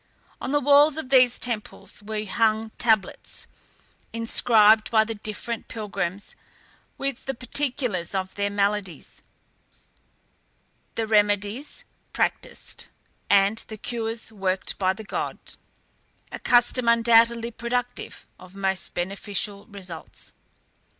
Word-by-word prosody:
On - - -3
the 290 - +3
walls 290 +2 +5
of 315 -5 -5
these 255 -2 +5
temples 230 -3 -4
were 215 0 -4
hung 220 +1 +1
tablets, 220 -4 0 0.7
inscribed 225 -1 +4
by 220 -1 +4
the 225 +1 -4
different 215 +2 -5
pilgrims 200 -3 -4 0.6
with 275 -2 -4
the 270 - -3
particulars 245 - -1
of 190 0 -2
their 200 0 -1
maladies, 200 -2 -2 1.7
the 225 - -1
remedies 210 +4 0 0.3
practised, - - -3 0.4
and 200 +2 +4
the 220 - -8
cures 225 0 -4
worked 190 -3 -2
by 185 -1 +3
the 215 +3 -7
god: 200 - -4 0.9
a - - -6
custom 245 0 +3
undoubtedly 230 0 +4
productive 245 +1 -4
of 185 +1 -14
most 190 -1 -1
beneficial 200 +2 -3
results. 185 -6 -9
220 Hz, 110 wpm, -25 LUFS, 200-235 Hz, 1.7 s, walls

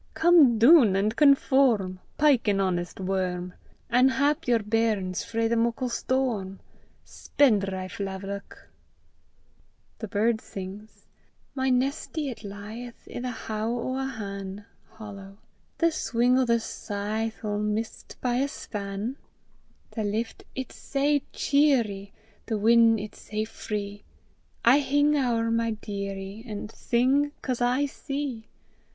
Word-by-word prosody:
Come 320 -8 +6
doon 235 - +7
an' 200 +2 +2
conform; 260 -8 +3 0.2
Pyke 285 -6 +4
an 200 -1 +2
honest 180 -2 -1
worm, 185 -1 -2 0.3
An' 255 +2 +4
hap 285 +4 +1
yer 240 -1 +4
bairns 210 -4 0
frae 225 0 -1
the 235 - +1
muckle 235 +2 0
storm, 235 -7 -1 0.5
Spendrife 195 -9 0
laverock! 195 +1 -7 1.3
THE 220 - -5
BIRD 220 +3 +1
SINGS: 200 +3 -9 0.5
My 265 -1 0
nestie 275 +3 -1
it 230 - -10
lieth 210 +4 -9
I' - - -3
the 250 +1 -3
how 220 -1 -3
(hollow) 240 - -3
o' 260 0 -2
a 265 - -1
han'; 200 -4 -6 1.1
The 335 -1 +3
swing 245 -3 +2
o' 260 - +3
the 235 -1 +3
scythe 220 +1 -4
'Ill 205 -1 -1
miss 210 +2 -2
't - - -13
by 245 -1 0
a 275 +2 +1
span. 210 0 -5 0.7
The 220 - -3
lift 220 +3 -3
it's 260 -2 -6
sae 285 +1 +1
cheerie! 235 -9 +1 0.4
The 220 - -1
win' 230 +1 +5
it's 210 0 -8
sae 215 0 -3
free! 205 -2 -5 0.6
I 250 +5 +7
hing 290 +1 +2
ower 235 -4 +1
my 230 0 +1
dearie, 200 0 -5
An' 210 -1 -5
sing 265 +6 +1
'cause 250 -2 -2
I 250 +4 +2
see. 275 -5 -5
230 Hz, 130 wpm, -26 LUFS, 205-260 Hz, 1.3 s, doon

